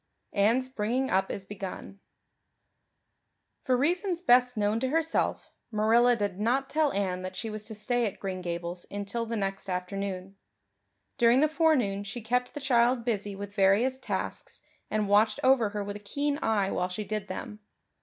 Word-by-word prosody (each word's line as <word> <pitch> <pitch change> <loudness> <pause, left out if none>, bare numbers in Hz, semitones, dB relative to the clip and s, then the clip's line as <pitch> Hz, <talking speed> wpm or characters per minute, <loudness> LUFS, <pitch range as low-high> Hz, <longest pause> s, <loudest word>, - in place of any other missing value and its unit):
Anne's 230 +6 +3
Bringing 255 +2 -1
up 190 +1 +2
Is 195 - -5
Begun 195 0 -7 1.7
FOR 255 -1 +3
reasons 350 +5 0
best 250 -4 +4
known 210 +1 +1
to 260 - 0
herself, 325 +2 0 0.2
Marilla 235 +3 +4
did 205 -4 -2
not 260 +5 0
tell 305 -1 +2
Anne 185 -2 -1
that 185 0 -6
she 225 +2 -4
was 215 0 -6
to 220 - -6
stay 235 +3 0
at 200 - -7
Green 190 -2 -4
Gables 175 0 -5
until 205 +3 -3
the 230 - -2
next 195 -2 -3
afternoon. 190 +1 -4 0.8
During 240 +2 +5
the 305 - +5
forenoon 290 - +2
she 210 +4 -6
kept 250 +3 -1
the - - -3
child 245 -2 +2
busy 205 -4 -2
with 200 0 -7
various 210 +7 +3
tasks - - -4 0.3
and 215 -1 0
watched 205 +2 +4
over 255 -5 +4
her 205 0 -3
with 205 0 -5
a - - -13
keen 285 +8 -2
eye 210 -7 +1
while 180 0 -1
she 185 +4 -4
did 210 0 -4
them. 210 +3 -6
215 Hz, 170 wpm, -28 LUFS, 200-250 Hz, 1.7 s, During